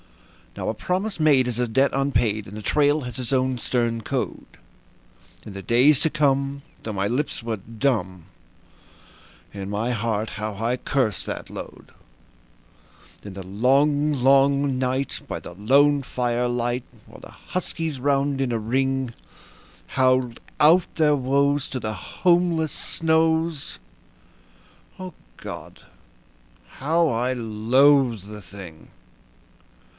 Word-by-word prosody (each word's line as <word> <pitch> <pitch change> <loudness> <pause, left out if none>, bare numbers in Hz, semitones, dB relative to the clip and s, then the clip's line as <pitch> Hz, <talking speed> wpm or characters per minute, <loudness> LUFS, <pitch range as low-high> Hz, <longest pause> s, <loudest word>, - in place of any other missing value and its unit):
Now - - -4
a - - 0
promise 190 +3 -2
made 140 -5 +4
is 120 -1 -3
a 125 - +1
debt 135 +5 +2
unpaid, 120 -6 0
and 100 +2 -9
the - - -6
trail 145 +5 +2
has 125 -1 -6
its 125 -1 -4
own 130 -1 +1
stern 115 -2 0
code. - - -4 0.9
In 105 - -8
the 100 - -7
days 125 +6 +4
to 160 - +2
come, 140 -2 0 0.2
though 110 - -4
my 100 -1 -1
lips 130 +6 -2
were 115 -1 -3
dumb, 105 - -2 1.3
in 100 -1 -6
my 110 +4 -1
heart 110 -2 -1
how 105 -1 -4
I 115 +4 -1
cursed 125 -5 -1
that - - -5
load. - - -10 1.3
In 100 - -8
the 95 0 -7
long, 140 +9 +2
long 140 0 +3
night, 130 +1 -1
by - - -5
the - - -10
lone 140 +9 +3
firelight, 120 -1 -1 0.2
while - - -14
the - - -12
huskies, 165 -5 -4
round 140 0 +1
in 130 -2 0
a 115 - 0
ring, 130 +2 -1 0.8
Howled 130 -2 +1 0.2
out 165 +4 +5
their 150 -2 +3
woes 140 +1 +1
to 130 - -4
the 110 -2 -3
homeless 170 - +1
snows 160 -1 0 1.2
O 185 -2 -7 0.2
God! - - -9 0.9
how 160 +5 +1
I 125 -1 0
loathed 120 0 +3
the 105 0 -9
thing. 90 -4 -12
130 Hz, 130 wpm, -23 LUFS, 115-145 Hz, 1.3 s, out